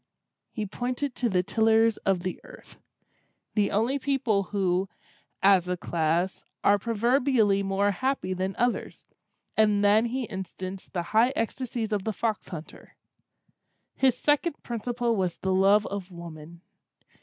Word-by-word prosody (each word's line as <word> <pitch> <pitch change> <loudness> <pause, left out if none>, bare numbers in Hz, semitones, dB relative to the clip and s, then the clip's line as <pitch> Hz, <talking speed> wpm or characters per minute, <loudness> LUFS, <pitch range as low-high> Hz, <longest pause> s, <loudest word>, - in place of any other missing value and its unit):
He 215 - -4
pointed 250 +6 -3
to 240 -1 -1
the 180 -3 +1
tillers 225 +2 +3
of 195 -2 0
the 185 - -4
earth—the 205 -2 -7
only 235 +7 +1
people 255 -8 +1
who, 190 -1 0 0.5
as 190 -2 +5
a 180 - -1
class, 170 +2 -1 0.2
are 205 0 +4
proverbially 235 -1 +2
more 195 +1 +1
happy 255 -2 -1
than 185 +1 -3
others—and 215 -3 -1
then 215 +3 +5
he 255 +2 -2
instanced 190 -1 -7
the 175 -2 -1
high 235 +4 +4
ecstasies 230 -3 -3
of 205 -2 0
the 220 - -2
fox 220 0 -2
hunter. 160 -4 -10 1.0
His 265 -2 +2
second 295 +1 0
principle 240 0 -1
was 185 -4 -1
the 190 0 -1
love 200 +2 +4
of 200 -2 -5
woman. 170 -1 -10
205 Hz, 130 wpm, -27 LUFS, 190-235 Hz, 1.0 s, as